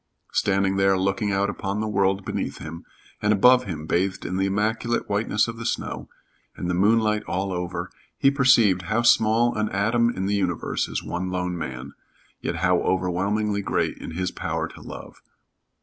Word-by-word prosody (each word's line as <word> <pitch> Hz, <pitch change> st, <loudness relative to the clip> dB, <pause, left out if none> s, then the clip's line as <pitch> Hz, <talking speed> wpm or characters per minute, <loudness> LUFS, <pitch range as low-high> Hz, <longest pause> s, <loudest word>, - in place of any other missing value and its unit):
Standing 95 Hz, -1 st, +1 dB
there 95 Hz, 0 st, +3 dB
looking 100 Hz, +2 st, 0 dB
out 100 Hz, +1 st, +1 dB
upon 100 Hz, 0 st, -3 dB
the 110 Hz, -, -1 dB
world 95 Hz, -1 st, +1 dB
beneath -, -, -3 dB
him 80 Hz, +1 st, -8 dB, 0.4 s
and 105 Hz, -, +2 dB
above 125 Hz, +5 st, +5 dB
him 80 Hz, -6 st, -5 dB
bathed 95 Hz, +4 st, -1 dB
in 90 Hz, -, -2 dB
the 95 Hz, 0 st, +1 dB
immaculate 110 Hz, +4 st, -1 dB
whiteness 105 Hz, +1 st, +1 dB
of 115 Hz, 0 st, -6 dB
the 115 Hz, -, -6 dB
snow, -, -, -4 dB, 0.5 s
and 90 Hz, -, -4 dB
the 90 Hz, -, 0 dB
moonlight 105 Hz, +3 st, +3 dB
over 90 Hz, -2 st, -2 dB
all, -, -, -11 dB, 0.3 s
he 135 Hz, -, +4 dB
perceived 120 Hz, -9 st, +4 dB
how 115 Hz, +2 st, +1 dB
small 115 Hz, +1 st, +4 dB
an 105 Hz, 0 st, 0 dB
atom 115 Hz, +4 st, +2 dB
in 95 Hz, -5 st, -3 dB
the 100 Hz, -, 0 dB
universe 95 Hz, -4 st, -1 dB
is -, -, -4 dB
one 90 Hz, +1 st, -3 dB
lone 90 Hz, -1 st, -2 dB
man, 65 Hz, -4 st, -6 dB, 0.5 s
yet -, -, -2 dB
how -, -, +2 dB
overwhelmingly 100 Hz, +3 st, 0 dB
great 95 Hz, -, -1 dB
in 80 Hz, -, -7 dB
his 90 Hz, 0 st, -1 dB
power -, -, -3 dB
to -, -, -13 dB
love. -, -, -10 dB
100 Hz, 180 wpm, -24 LUFS, 90-110 Hz, 0.5 s, above